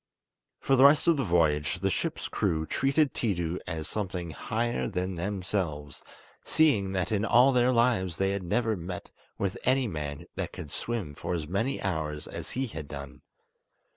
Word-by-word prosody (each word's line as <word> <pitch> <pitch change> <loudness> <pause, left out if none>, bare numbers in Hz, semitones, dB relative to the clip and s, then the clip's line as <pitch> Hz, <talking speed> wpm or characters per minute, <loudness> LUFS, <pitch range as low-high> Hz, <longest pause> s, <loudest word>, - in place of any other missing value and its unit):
For 135 - +2
the 130 +1 +7
rest 145 +2 +6
of 170 -1 +5
the 135 - +1
voyage 80 - +2
the - - +1
ship's - - -2
crew 80 -1 0
treated 135 - +2
Tiidu 90 -6 -1
as 80 -1 -3
something 90 -5 -3
higher 115 +9 -1
than 95 -2 -2
themselves, 90 -5 -3 0.4
seeing 105 -12 +3
that 90 -1 -1
in 105 -1 +1
all 125 +4 +6
their 125 0 +4
lives 115 -8 +2
they 95 0 +1
had 100 0 -2
never 110 +5 0
met 90 0 -7 0.3
with 100 -1 -2
any 130 0 +3
man 75 -6 -5
that - - -4
could - - -8
swim 110 -11 -2
for 90 - -3
as 80 -3 -4
many 115 - -1
hours 80 -5 -2
as - - -7
he 135 - +1
had 80 - -7
done. 70 -1 -8
95 Hz, 170 wpm, -28 LUFS, 80-120 Hz, 0.4 s, the